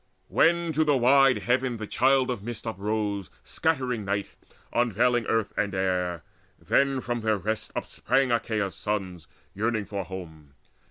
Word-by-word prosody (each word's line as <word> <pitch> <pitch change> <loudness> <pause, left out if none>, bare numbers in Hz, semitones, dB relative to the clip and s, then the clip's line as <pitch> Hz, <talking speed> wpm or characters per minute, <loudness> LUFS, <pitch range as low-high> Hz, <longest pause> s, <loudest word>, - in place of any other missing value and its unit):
When 170 -1 +3
to 155 +2 +3
wide 135 -2 +4
heaven 125 0 +1
the 110 - -5
Child 130 +3 +2
of 120 - -4
Mist 120 +2 -6
uprose, 105 -2 -2
Scattering 130 -8 -1
night, 100 0 -2 0.4
unveiling 120 0 +2
earth 110 -2 0
and 100 -2 -1
air, 90 -3 -1 0.3
Then 135 -1 +1
from 120 -1 -3
their 110 -1 +1
rest 110 +3 -3
upsprang 130 +1 0
Achaea's 110 -4 0
sons 95 -6 -4 0.3
Yearning 110 +1 -1
for 100 -1 -4
home. 80 -6 -10
110 Hz, 140 wpm, -27 LUFS, 100-125 Hz, 0.4 s, wide